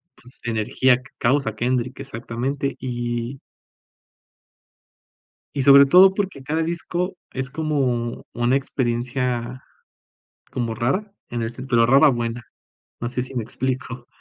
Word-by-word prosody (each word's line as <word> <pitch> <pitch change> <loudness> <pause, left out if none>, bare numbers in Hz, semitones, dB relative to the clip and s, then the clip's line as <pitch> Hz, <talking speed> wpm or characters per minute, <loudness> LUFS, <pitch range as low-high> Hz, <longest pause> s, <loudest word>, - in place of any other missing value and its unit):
pues, 125 +2 -9
energía 120 +3 +2
que 130 +1 -16
causa 130 -3 +1
Kendrick, 125 +2 -1
exactamente, 130 +5 -3
y 120 +1 -3 2.2
y 140 - 0
sobre 140 +1 +8
todo, 185 +6 +7
porque 190 -9 -3
cada 155 +4 -1
disco 175 +3 -2 0.2
es 130 +1 -3
como 135 -6 -1
una 120 +2 +2
experiencia 125 -1 -2 0.9
como 115 -3 -2
rara, 140 - -1 0.2
en 120 -1 -3
el 115 +1 -3
ten 130 +2 -8
pero 120 -3 +4
rara 135 +5 +6
buena, 120 -2 -2 0.6
no 120 - -2
sé 125 +1 -2
si 130 - -7
me 120 - -1
explico. 125 +1 -4
125 Hz, 125 wpm, -22 LUFS, 120-140 Hz, 2.2 s, sobre